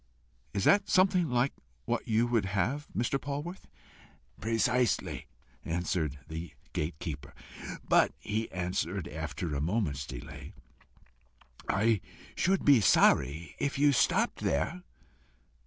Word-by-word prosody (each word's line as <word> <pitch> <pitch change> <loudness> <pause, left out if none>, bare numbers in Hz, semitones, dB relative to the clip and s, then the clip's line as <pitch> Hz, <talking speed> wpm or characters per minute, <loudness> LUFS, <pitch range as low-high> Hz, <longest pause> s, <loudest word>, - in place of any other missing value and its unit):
Is 100 - 0
that 200 0 +4
something 185 -3 +4
like 125 +2 +1 0.3
what - - -2
you 110 +2 +3
would 120 -4 +1
have, 115 +10 -1
Mr. 120 +4 0
Polwarth?" 145 +6 -5 0.7
"Precisely," 120 +1 +1 0.4
answered 80 -3 -1
the 80 +2 -6 0.2
gate 75 +1 -2
keeper. 70 -3 -6 0.5
"But," - - +5
he 110 +2 -3
added, 90 0 -2
after 80 +1 -4
a 70 - -1
moment's 75 -5 -1
delay, 65 -3 -8 1.2
"I 105 +1 +2 0.3
should 190 +1 +1
be 140 -5 +7
sorry 75 -4 +3
if 140 -1 -1
you 145 +1 +5
stopped 135 - +2
there." 80 - -1
105 Hz, 115 wpm, -30 LUFS, -, 1.2 s, be